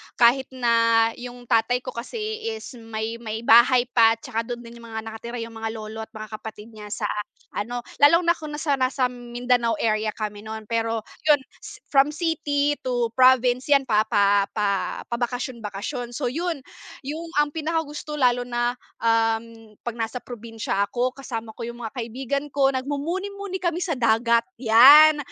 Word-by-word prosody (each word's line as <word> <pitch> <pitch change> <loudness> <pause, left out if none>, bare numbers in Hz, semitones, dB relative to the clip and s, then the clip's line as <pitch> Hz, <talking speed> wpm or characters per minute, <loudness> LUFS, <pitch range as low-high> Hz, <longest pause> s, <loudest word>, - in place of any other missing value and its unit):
kahit 245 +2 +4
na 230 -3 +3 0.2
yung 245 0 -9
tatay 245 +2 +1
ko - - -5
kasi 435 - -5
is 445 -7 -5
may 225 0 -5
may 225 0 -5
bahay 240 +2 +6
pa 225 -1 +5
tsaka 225 0 -4
dun 240 0 -5
din 235 0 -12
yung 230 - -12
mga 220 -1 -5
nakatira 225 +2 -7
yung 230 - -8
mga 225 0 -5
lolo 220 0 -7
at 220 - -6
mga 215 0 -8
kapatid 220 +1 -10
niya 210 -1 -10
sa 210 0 -3 0.4
ano, 240 +4 -4 0.2
lalong 335 +5 +6
na 340 - +4
kung 305 -3 -4
nasa 290 -3 0
nasam 255 -1 +1 0.2
Mindanao 245 -2 +1
area 215 0 0
kami 210 -1 -4
nun 220 +1 -7
pero, 225 0 -1 0.2
yun 290 -3 +5 0.2
s - - -10 0.2
from 275 0 +5
city 295 -2 0
to 245 -2 -1
province 255 0 +4
yan 280 -1 +4
pa 215 -4 +2
pa 200 0 +3
pa 200 -2 -1
pabakasyon 245 +1 -3
bakasyon. 235 +4 -5
So 250 -4 -1
yun, 330 -2 -3 0.4
yung 315 +5 -5
ang 295 0 +2
pinakagusto 310 -1 -3
lalo 245 -3 +2
na, 240 0 -1 0.2
um, 225 -1 0
pag 240 -1 -4
nasa 225 +2 -3
probinsya 225 -4 -3
ako 245 +4 -1
kasama 230 -4 -6
ko 230 0 -7
yung 235 0 -8
mga 225 - -4
kaibigan 240 +3 -6 0.3
ko, 275 -1 +4
nag-mumuni-muni 360 +9 -3
kami 345 -1 -2
sa 325 -7 -1
dagat, 230 0 +3 0.2
yan. 280 +7 +8
240 Hz, 170 wpm, -24 LUFS, 225-280 Hz, 0.4 s, yan